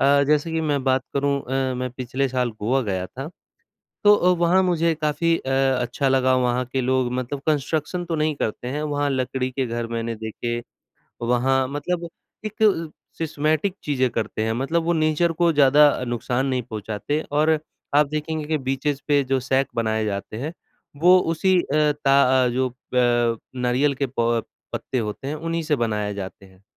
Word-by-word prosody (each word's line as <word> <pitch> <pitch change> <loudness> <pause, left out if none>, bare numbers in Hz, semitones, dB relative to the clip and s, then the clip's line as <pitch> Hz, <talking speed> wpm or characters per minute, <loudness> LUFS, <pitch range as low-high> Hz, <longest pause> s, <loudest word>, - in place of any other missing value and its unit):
अ, 140 +1 +5
जैसे 150 +2 +2
कि 160 - 0
मैं 145 -3 0
बात 130 0 +2
करूँ 140 0 +1
अ, 130 0 -1
मैं 125 0 -3
पिछले 130 +2 -1
साल 125 -1 0
गोवा 130 +6 +1
गया 95 -4 -2
था, 135 - -7 0.8
तो 205 0 +8
अ, 180 - +2
वहाँ 175 +2 +4
मुझे 170 -2 +2
काफ़ी 165 +2 +1
अ, 135 - -6 0.3
अच्छा 135 +3 -1
लगा। 130 -1 +3
वहाँ 125 0 +1
के 135 - +1
लोग 130 -1 +1
मतलब 130 +2 -3
कंस्ट्रक्शन 155 +4 -1
तो 165 -1 -3
नहीं 155 0 +1
करते 125 +1 -3
हैं, 145 +3 -3
वहाँ 145 -1 -1
लकड़ी 130 0 -1
के 130 0 -2
घर 115 0 -3
मैंने 115 0 -2
देखे। 115 +2 -4 0.6
वहाँ 130 +2 +2
मतलब 170 +4 -3 0.4
एक 215 +1 -5
अ, 165 -7 +3 0.3
सिस्टमेटिक 155 +4 0
चीज़ें 130 -4 +1
करते 110 -1 -2
हैं 110 - 0
मतलब 140 +8 0
वो 170 - +2
नेचर 155 +1 +2
को 170 0 +2
ज़्यादा 145 +1 +6
अ, 130 -3 -1
नुकसान 125 +2 -1
नहीं 130 -2 0
पहुँचाते 110 +6 -3
और 155 +2 +3 0.4
आप 150 0 +5
देखेंगे 155 +1 -3
कि 155 -1 0
बीचेज़ 135 +2 -2
पे 145 -1 +4
जो 130 0 0
सैट 130 +2 +1
बनाए 110 -1 0
जाते 100 +1 -4
हैं, 150 +7 -4 0.4
वो 180 +4 +6 0.2
उसी 185 +2 +3
अ, 150 +1 +2
ता 140 0 +5 0.2
अ, - - +3
जो 130 0 -1 0.2
प 120 -2 +2 0.2
नारियल 125 +3 +1
के 140 +1 -1
प 115 -1 +2 0.3
पत्ते 130 - -3
होते 110 +5 -4
हैं, 150 - -2
उन्हीं 165 +1 -3
से 150 -1 +1
बनाए 105 -4 -1
जाते 95 0 -7
हैं। 95 0 -22
135 Hz, 185 wpm, -23 LUFS, 125-155 Hz, 0.8 s, तो